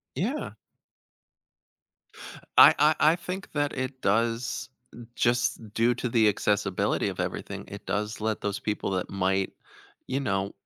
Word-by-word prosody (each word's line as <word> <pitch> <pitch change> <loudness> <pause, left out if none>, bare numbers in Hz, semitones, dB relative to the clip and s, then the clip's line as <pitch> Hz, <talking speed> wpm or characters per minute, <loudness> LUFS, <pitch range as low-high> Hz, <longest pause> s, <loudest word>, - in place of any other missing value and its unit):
Yeah. - - -2 2.1
I - - +10
I 150 +2 +5 0.2
I - - -1
think 180 +3 -6
that 145 -1 0
it 130 0 -4
does 115 +5 0 0.5
just 120 -3 0
due 115 +2 +3
to 125 0 -3
the 115 -2 +4
accessibility 105 -2 +1
of - - -5
everything, - - -5
it - - -10
does 105 +1 -2
let 110 0 -2
those 100 0 -2
people 105 -2 -2
that 95 -1 -2
might, 95 0 0 0.5
you 130 +1 -1
know, 100 -6 -1
115 Hz, 135 wpm, -27 LUFS, 100-130 Hz, 2.1 s, I